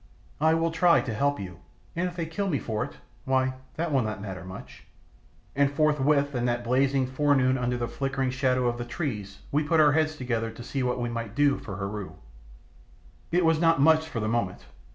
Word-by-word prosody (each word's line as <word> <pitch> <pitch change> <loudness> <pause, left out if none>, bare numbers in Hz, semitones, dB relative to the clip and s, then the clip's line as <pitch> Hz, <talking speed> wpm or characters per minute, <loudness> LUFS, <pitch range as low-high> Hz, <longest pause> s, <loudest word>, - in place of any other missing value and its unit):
"I 160 +2 +4
will 165 0 +1
try 170 +1 +4
to 115 - -4
help 140 +4 0
you; 90 -4 -7 0.4
and 175 +2 0
if 175 - -7
they 170 -2 -2
kill 195 +5 -2
me 145 - +1
for 110 -4 -2
it - - -7 0.3
why, 130 0 +1 0.2
that 165 0 -2
will 135 -2 +3
not 110 -2 -3
matter 95 -2 -6
much." 95 +1 -10 0.7
And 140 0 +3
forthwith 145 -1 +2
in 120 -1 -1
that 120 0 0
blazing 130 +2 +2
forenoon 130 -1 +2
under 125 -1 -1
the 120 -1 -2
flickering 135 -1 -2
shadow 130 -1 +1
of 120 0 0
the - - -2
trees 110 - -5
we 150 +2 +2
put 160 +2 +2
our 150 -1 +6
heads 155 +1 +1
together 115 -5 -2
to 115 +2 -10
see 135 +2 -3
what 125 0 0
we 120 0 -1
might 115 -2 -5
do 145 -1 +3
for 95 - -7
Heru. 100 0 -5 1.2
It 175 0 +3
was 160 -1 +3
not 165 -1 +4
much 160 +2 +4
for 125 - -3
the 110 - -1
moment. 110 -5 -2
130 Hz, 210 wpm, -27 LUFS, 120-150 Hz, 1.2 s, our